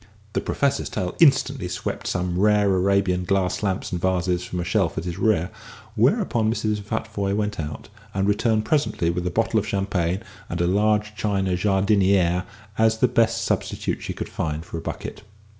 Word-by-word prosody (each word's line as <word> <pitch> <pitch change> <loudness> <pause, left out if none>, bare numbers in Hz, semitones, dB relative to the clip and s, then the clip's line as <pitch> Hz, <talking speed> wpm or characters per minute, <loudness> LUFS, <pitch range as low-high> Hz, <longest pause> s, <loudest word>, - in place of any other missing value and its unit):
The - - 0
Professor's 140 -1 0
tail 90 -1 -3
instantly 135 - +4
swept 90 +1 -4
some 90 -1 -1
rare 105 -1 +4
Arabian 95 -1 +2
glass 95 0 0
lamps 95 -3 -2
and 90 -2 -3
vases 90 -1 +1
from 90 - -5
a - - -1
shelf 90 0 0
at 80 - -2
his 90 +1 -4
rear, 100 -6 +2 0.4
whereupon 120 - +2
Mrs. 110 -2 -1
Futvoye 100 -2 -2
went 105 -2 -2
out, 75 -1 -5 0.2
and 95 0 0
returned 110 +1 +2
presently 140 - +1
with 90 +1 -2
a - - +1
bottle 115 +4 +1
of 105 - -4
champagne 95 -1 -1 0.3
and 85 - -3
a 85 - +2
large 105 +3 +2
china 100 -3 0
jardinière, 95 -1 +2 0.3
as 110 0 +4
the 125 - +4
best 115 -1 +2
substitute - - -2
she - - -4
could - - -5
find 80 +1 -3
for 80 - -6
a - - -8
bucket. - - -6
100 Hz, 175 wpm, -23 LUFS, 90-110 Hz, 0.4 s, instantly